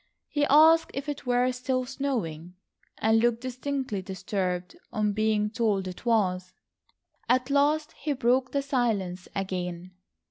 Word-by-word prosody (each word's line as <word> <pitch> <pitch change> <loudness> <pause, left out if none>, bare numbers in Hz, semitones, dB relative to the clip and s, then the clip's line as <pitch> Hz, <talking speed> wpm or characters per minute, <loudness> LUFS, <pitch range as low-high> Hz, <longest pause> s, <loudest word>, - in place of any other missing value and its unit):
He 290 -1 +1
asked 320 +3 +6
if 275 +2 -4
it 290 -3 -5
were 250 +1 +3
still 255 0 -1
snowing, 180 - -3 0.4
and 220 +1 +3
looked 235 0 +1
distinctly 255 -4 -3
disturbed 185 - -3 0.2
on 210 -2 0
being 215 0 +1
told 215 -5 0
it 185 +6 -8
was. 185 -5 +1 0.8
At 255 +2 +2
last 300 +2 +2
he 295 0 -3
broke 255 0 +1
the 280 -1 0
silence 215 -10 -1
again. 180 -2 -4
235 Hz, 135 wpm, -27 LUFS, 190-270 Hz, 0.8 s, asked